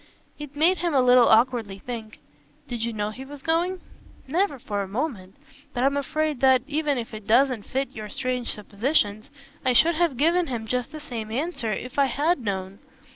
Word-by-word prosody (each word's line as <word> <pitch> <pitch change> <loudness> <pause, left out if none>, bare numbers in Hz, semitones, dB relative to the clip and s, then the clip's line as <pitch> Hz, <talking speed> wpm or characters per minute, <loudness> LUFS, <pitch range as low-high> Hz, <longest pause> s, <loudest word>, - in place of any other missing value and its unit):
It 295 -1 -8
made 335 +5 +3
him 340 -3 0
a - - +5
little 250 -1 +6
awkwardly 225 -3 +3
think. 220 0 -7 0.5
"Did 240 -3 -4
you 235 - -1
know 210 -1 -2
he 255 +5 -8
was 280 0 -11
going?" 345 +3 0 0.5
"Never 335 +1 +1
for 210 -5 -3
a 195 - -4
moment; 205 -4 -4 0.4
but 245 - 0
I'm 275 +1 +3
afraid 300 0 -1
that 260 -1 +5
even 295 -1 0
if 230 -2 -5
it 215 -1 -8
doesn't 245 -1 +3
fit 270 +1 -2
your 215 -2 -6
strange 255 -2 -2
suppositions 210 0 -1 0.3
I 255 -2 +3
should 330 +7 +5
have 325 -5 +1
given 335 +5 +3
him 235 -4 -4
just 250 +3 -2
the 310 - -7
same 235 -7 -6
answer 250 -2 -2
if 250 +5 -4
I 280 - +6
had 290 +6 +1
known. 195 -3 -4
255 Hz, 190 wpm, -25 LUFS, 220-295 Hz, 0.5 s, little